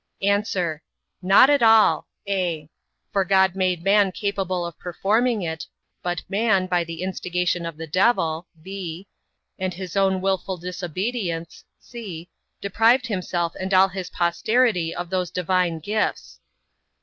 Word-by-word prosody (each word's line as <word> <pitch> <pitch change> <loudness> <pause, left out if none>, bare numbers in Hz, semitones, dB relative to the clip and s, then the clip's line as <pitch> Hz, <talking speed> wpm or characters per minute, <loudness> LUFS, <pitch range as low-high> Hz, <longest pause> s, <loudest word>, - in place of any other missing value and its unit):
A. 200 +1 +3 0.8
Not 195 +9 +6
at 285 - +3
all; 225 -1 +5 0.2
(a) 175 -6 -1 0.5
for 195 - +3
God 190 0 +3
made 185 -3 0
man 200 0 +4
capable 185 -2 -2
of 170 -2 -8
performing 215 +5 0
it; 160 -1 -4 0.3
but 175 -2 -3
man, 200 -1 +2
by 180 -2 +1
the 165 +1 -6
instigation 180 -2 -1
of 165 -2 -7
the 165 - -6
devil, 170 -2 +1 0.2
(b) 190 -1 -6 0.5
and 185 -1 -2
his 185 0 -7
own 190 -1 +2
wilful 190 0 -1
disobedience, 180 0 -4 0.2
(c) 190 -9 -8 0.3
deprived 225 +6 +3
himself 180 -6 -2
and 190 0 0
all 190 +1 +6
his 185 -1 -6
posterity 180 +1 +1
of 175 -1 -5
those 185 -2 0
divine 180 -1 0
gifts. 210 +7 -2
185 Hz, 135 wpm, -23 LUFS, 175-200 Hz, 0.8 s, Not